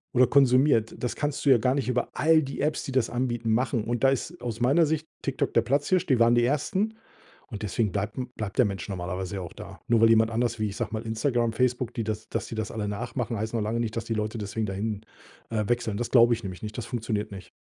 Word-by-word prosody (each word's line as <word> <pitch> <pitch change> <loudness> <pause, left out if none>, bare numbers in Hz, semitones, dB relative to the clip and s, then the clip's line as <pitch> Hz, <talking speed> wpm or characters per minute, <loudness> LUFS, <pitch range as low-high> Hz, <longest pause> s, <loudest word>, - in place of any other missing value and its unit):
oder 130 +1 +7
konsumiert. 130 -3 +4
Das 125 - -3
kannst 145 0 -2
du 140 - +5
ja 130 - +8
gar 125 +3 +1
nicht 135 -4 -1
über 125 -1 0
all 160 0 +4
die 135 -1 -5
Apps, 150 +1 0
die 135 - -5
das 130 -4 +2
anbieten, 120 -2 -1
machen. 120 0 +1
Und 120 +3 0
da - - +7
ist 155 +6 -3
aus 120 -1 -4
meiner 145 +7 +4
Sicht 155 +1 -1 0.2
TikTok 135 -2 -2
der 115 - +4
Platzhirsch. 145 +8 +1
Die 130 -4 +3
waren 115 0 +5
die 120 - +4
ersten. 190 - 0 0.5
Und 110 -1 -7
deswegen 105 0 0
bleibt 105 +4 -3
m 125 -1 -3
bleibt 105 -3 -5
der 125 - +6
Mensch 95 -4 -4
normalerweise 95 +1 -4
ja 95 - -3
auch 85 - -7
da. - - -11
Nur 115 - +4
weil 115 - +7
jemand 115 0 +4
anders 120 0 -1
wie, 110 - +1
ich 100 - -8
sage 120 -2 -3
mal 110 - -2
Instagram, 115 +1 0
Facebook, 125 0 0
die 115 - -3
das 110 0 -4
dass - - -3
die 115 - -6
das 110 -1 -3
alle 110 -2 -3
nachmachen, 115 +3 -3
heißt 110 +2 -3
noch 115 - 0
lange 115 +3 -1
nicht, 115 0 -3
dass 115 - -3
die 115 - -2
Leute 110 +1 -2
deswegen 105 +1 -3
dahin, 105 +2 -3 0.4
äh, 110 -2 -1
wechseln. 120 -4 0
Das 120 +1 -2
glaube 120 -1 +6
ich 115 -1 -4
nämlich 95 0 -7
nicht. 105 +2 -6
Das 120 - -4
funktioniert 115 -4 -3
nicht. 95 -2 -9
115 Hz, 260 wpm, -27 LUFS, 110-130 Hz, 0.5 s, ja